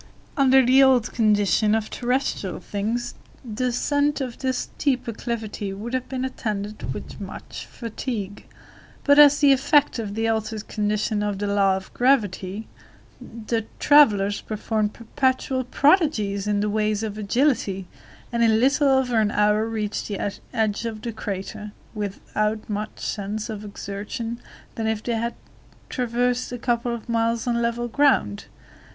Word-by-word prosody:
Under 265 -2 +5
the 260 +2 +6
old 255 -4 +4
condition 210 -1 +3
of 220 -1 -2
terrestrial 250 -6 -1
things, 230 +4 -3 0.3
the 235 +2 -2
ascent 285 +4 +1
of 255 -4 -5
this 260 -1 -1
steep 265 -5 -1
acclivity 220 -3 -4
would 220 +5 -6
have 255 -1 -2
been 260 -1 -2
attended 215 -5 -4
with - - -8
much - - -8
fatigue, 220 -3 -5 0.6
but 285 0 +5
as 290 -1 +8
the 285 -1 +7
effect 275 0 +3
of 205 -3 -4
the 225 +1 0
altered 220 -1 -2
condition 210 0 -1
of 205 -1 -1
the 205 - -2
law 200 -1 +3
of 190 - -10
gravity, 215 -5 +1 0.8
the 225 -1 -1
travelers 205 -9 +5
performed 215 0 -1
perpetual 260 +2 0
prodigies 250 - +2
in 205 -1 +1
the 210 - 0
way 215 0 +1
of 210 0 -3
agility, 210 -3 0 0.4
and 235 -1 +1
in 220 -1 +4
little 275 +4 +3
over 265 -3 +2
an 210 - +2
hour 210 +1 +2
reached 215 -2 -3
the 205 - -3 0.3
edge 220 -2 0
of 220 -2 -5
the 235 - -3
crater, 205 -1 -6 0.2
without 210 +1 -2
more 210 0 -2
sense 210 +2 -4
of 210 -1 -6
exertion 210 +4 -5 0.3
than 225 -1 -3
if 220 -1 -1
they 240 - -1
had 235 +1 -2 0.5
traversed 245 0 0
a 245 - -4
couple 240 0 0
of 235 -1 -6
miles 230 0 0
on 235 -1 0
level 235 +1 -1
ground. 240 - +2
225 Hz, 150 wpm, -24 LUFS, 210-250 Hz, 0.8 s, as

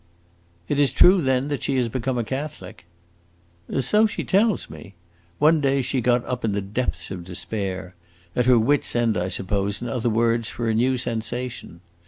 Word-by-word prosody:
"It 145 - 0
is 145 -2 +4
true, 185 0 +6
then, 130 0 +1
that 145 - -2
she 140 - -1
has 125 -2 +1
become 130 +2 -2
a 120 - 0
Catholic?" 130 - -6 1.0
"So 210 - +3
she - - -4
tells 205 +2 +2
me. 100 -4 -12 0.4
One 155 +1 +4
day 135 -1 +1
she 130 0 -1
got 120 0 +2
up 125 -1 -4
in 110 -3 0
the 100 - 0
depths 100 -4 -3
of 90 -2 -6
despair; 95 0 -3 0.4
at 125 0 +1
her 125 -1 +6
wit's 135 +5 +1
end, 115 -2 +2
I 90 +1 -1
suppose, 100 +2 -1
in 120 - -5
other 120 0 -1
words, 115 0 +1
for 120 - -4
a 110 - +1
new 125 +4 +2
sensation. 120 -5 -4
120 Hz, 185 wpm, -23 LUFS, 105-135 Hz, 1.0 s, true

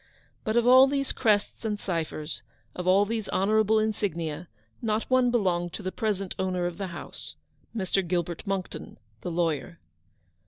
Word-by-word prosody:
But 220 +2 0
of 235 - +4
all 260 +2 +8
these 275 -1 0
crests 210 -2 +1
and 210 -2 -1
ciphers, 165 -4 -3 0.3
of 180 0 -4
all 195 +2 +5
these 220 0 -3
honourable 215 +2 +3
insignia, 180 -7 -1 0.3
not 220 -1 0
one 255 -1 +5
belonged 180 -7 +1
to 210 - -6
the 185 - -2
present 195 -1 -1
owner 185 -1 0
of 175 +1 -4
the 195 - -2
house 170 -1 -8 0.2
— - - -33
Mr. 190 -2 0
Gilbert 175 -1 -1
Monckton, 195 -2 -4 0.2
the - - -3
lawyer. 165 -2 -1
195 Hz, 160 wpm, -27 LUFS, 175-220 Hz, 0.3 s, all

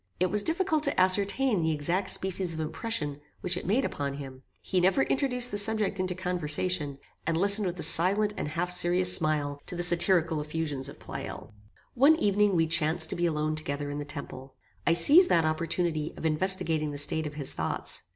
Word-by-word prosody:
It 180 0 0
was 210 +1 +2
difficult 320 - -1
to - - -1
ascertain 200 +4 +2
the 160 0 0
exact 170 +6 -2
species 185 -2 -3
of - - -7
impression 155 - -4 0.2
which 180 0 -1
it 180 - -7
made 240 +8 +1
upon 140 -1 -4
him. 135 -2 -10 0.2
He 185 - -2
never 195 +9 +2
introduced 250 -3 -1
the 205 - +1
subject 210 -2 +2
into 185 -1 -2
conversation, 180 -4 -1 0.3
and 165 -1 0
listened 200 +2 +5
with 180 0 -5
a - - -3
silent 195 +6 +2
and - - -5
half 170 +4 -3
serious 180 0 +3
smile 150 -3 -1
to - - -7
the 175 - -2
satirical 170 -2 +1
effusions 150 -3 -5
of - - -13
Pleyel. - - -9 0.4
One 280 +6 +4
evening 205 - +1
we 165 -1 +2
chanced 160 0 +2
to - - -3
be 175 0 -1
alone 155 -1 -2
together 145 -2 -5
in 145 - -5
the - - -4
temple. 140 -2 -10 0.3
I 170 - +4
seized 300 - +6
that 165 -2 +2
opportunity 155 0 -2
of - - -8
investigating 160 -1 +2
the 145 - -7
state 150 +2 +2
of 145 - -10
his 145 -3 0
thoughts. - - -3
170 Hz, 195 wpm, -27 LUFS, 155-195 Hz, 0.4 s, seized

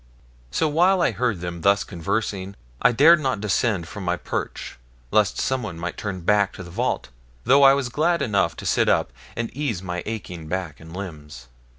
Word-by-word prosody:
So 160 - +1
while 180 +5 +3
I - - +3
heard 120 -8 -1
them 85 -1 -5
thus 100 +3 +3
conversing 100 +1 -3 0.3
I - - +5
dared 155 +8 +6
not 130 -7 -1
descend 100 -3 0
from 100 - -7
my 90 0 0
perch, - - -5 0.3
lest 105 -3 +3
someone 110 -10 -2
might 85 +1 -4
turn 100 -3 -5
back 100 +2 +2
to 95 - -8
the 90 - -11
vault, 120 - -1 0.3
though 135 +4 +5
I 135 0 +8
was 140 -3 -2
glad 160 +3 +1
enough 100 -8 +1
to - - -9
sit - - +2
up, - - +1 0.2
and 115 +1 -4
ease 125 -11 -2
my 90 -1 -3
aching 90 -7 -6
back 90 -3 -4
and 80 0 -12
limbs. 75 -10 -8
100 Hz, 190 wpm, -23 LUFS, 90-125 Hz, 0.3 s, I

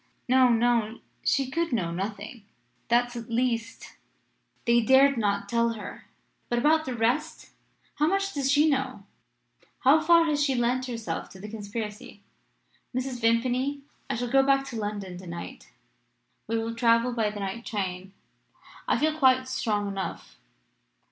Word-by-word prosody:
"'No 255 0 +5
no 235 -1 +1 0.2
she 270 -2 +1
could 335 +2 -1
know 185 -9 -1
nothing! 205 +5 -5 0.4
That, 240 +1 +2
at 235 0 -7
least, 230 -1 -2 0.7
they 235 0 +4
dared 265 +4 +5
not 200 -3 0
tell 235 +1 +1
her. 210 -3 -9 0.4
But 240 - 0
about 310 +5 +3
the 255 - -3
rest? 255 +8 -1 0.5
How 300 - +3
much 390 +2 0
does 275 -2 0
she 295 +2 +4
know? 265 -7 -1 0.8
How 290 +5 +5
far 335 +1 +5
has 295 -2 +1
she 275 -2 +1
lent 250 +2 0
herself 230 -3 -4
to 190 - -13
the 205 - -8
conspiracy? 210 -1 -7 0.7
Mrs. 255 -1 -3
Vimpany, 250 +5 +1 0.3
I 270 - -1
shall 240 +1 -3
go 270 0 +6
back 275 0 +2
to - - -7
London 205 -4 -4
to 185 - -11
night. 170 0 -8 0.8
We 230 - 0
will 225 0 -2
travel 230 +1 +2
by 225 -3 0
the 210 0 -7
night 195 +4 -4
train. 190 -3 -4 0.8
I - - +2
feel 310 0 +1
quite 260 -3 +3
strong 210 -5 -1
enough.' 195 -1 -5
235 Hz, 155 wpm, -27 LUFS, 215-265 Hz, 0.8 s, go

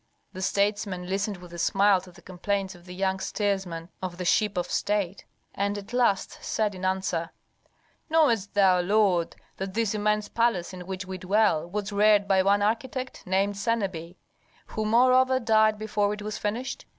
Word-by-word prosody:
The 185 - -7
statesman 200 -2 0
listened 195 +1 -2
with 175 -1 -13
a 170 - -7
smile 195 +1 +3
to 185 0 -14
the - - -18
complaints 190 +1 -3
of 175 -1 -17
the 180 - -8
young 190 0 0
steersman 190 -5 -2
of 180 -2 -5
the 180 - -4
ship 210 +2 +2
of 175 - 0
state, 200 0 -1 0.3
and 200 +1 -1
at 205 +3 -9
last 235 -6 +1
said 215 -2 -1
in 185 0 -9
answer, 185 -3 -1 0.8
"Knowest 240 -12 +2
thou, 190 -3 +5
lord, 190 -3 +2 0.2
that 190 0 -5
this 225 -2 +1
immense 210 0 0
palace 230 -7 0
in 180 -1 -9
which 190 0 -5
we 185 0 -6
dwell 185 -4 +2
was 205 +2 -3
reared 205 0 +4
by 190 -1 +4
one 200 +1 +3
architect, 255 +4 -2
named 195 +2 +1
Senebi, 190 -6 -2 0.5
who 215 - -4
moreover 255 +3 +4
died 220 -2 +3
before 210 -1 0
it 210 - -9
was 215 0 -4
finished? 225 +5 -3
200 Hz, 175 wpm, -26 LUFS, 185-215 Hz, 0.8 s, thou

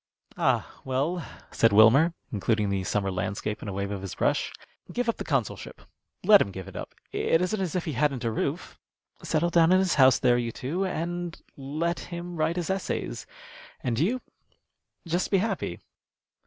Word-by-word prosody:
"Ah, - - 0
well," 145 +7 -1 0.3
said 115 - +4
Winner, 115 +11 +6 0.2
including 105 0 0
the 95 -1 -1
summer 95 +1 0
landscape 100 +3 -3
in - - -7
a - - -3
wave 100 +1 -3
of 100 -2 -4
his 95 -2 -6
brush, - - +1 0.4
"give 245 -1 -1
up 230 - 0
the - - -4
consulship. 135 -8 -2 0.4
Let - - +8
him - - +1
give 95 -1 -8
it - - -11
up. - - -7 0.2
It 165 - +2
isn't 195 +3 -1
as 185 -3 -2
if 180 - -1
he 155 - -2
hadn't 140 -1 0
a 115 - 0
roof. - - -3 0.4
Settle 170 +2 0
down 165 0 +5
in 185 - +6
his 185 -2 +2
house 130 -1 +7
there, 120 -1 +3
you 120 -1 -2
two, 155 +12 -3
and 175 -1 -3 0.2
let 155 +5 -2
him 175 0 -7
write 160 +1 0
his 175 +1 -1
essays, 190 - -3 0.6
and 120 -2 0
you 230 - +1 0.9
just 175 +2 0
be 195 - +3
happy." 190 - -1
155 Hz, 180 wpm, -27 LUFS, 110-175 Hz, 0.9 s, Let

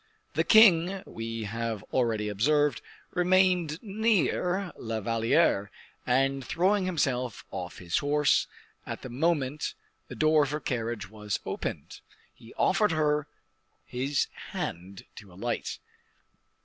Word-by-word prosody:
The - - +2
king, 190 -4 +6
we 115 0 -5
have 115 0 -3
already 115 -4 +1
observed, 145 +6 +2 0.3
remained 180 -3 +3
near 200 -3 0
La 115 -1 -4
Valliere, 110 -2 +2 0.4
and, 135 +2 +2
throwing 185 +7 +1
himself 130 - -1
off 90 -2 -6
his 85 -2 -1
horse 145 0 +2 0.4
at - - -7
the 130 - -6
moment 145 +1 -1 0.3
the - - -8
door 155 0 +4
of 140 - -2
her 150 +1 -2
carriage 115 -7 -3
was 105 -2 -3
opened, - - -5 0.3
he 115 - -16
offered 210 -2 +2
her 150 -1 +1 0.6
his 135 +3 -1 0.3
hand 90 +3 -5
to 100 -3 -12
alight. 115 +6 -3
135 Hz, 120 wpm, -28 LUFS, 115-170 Hz, 0.6 s, king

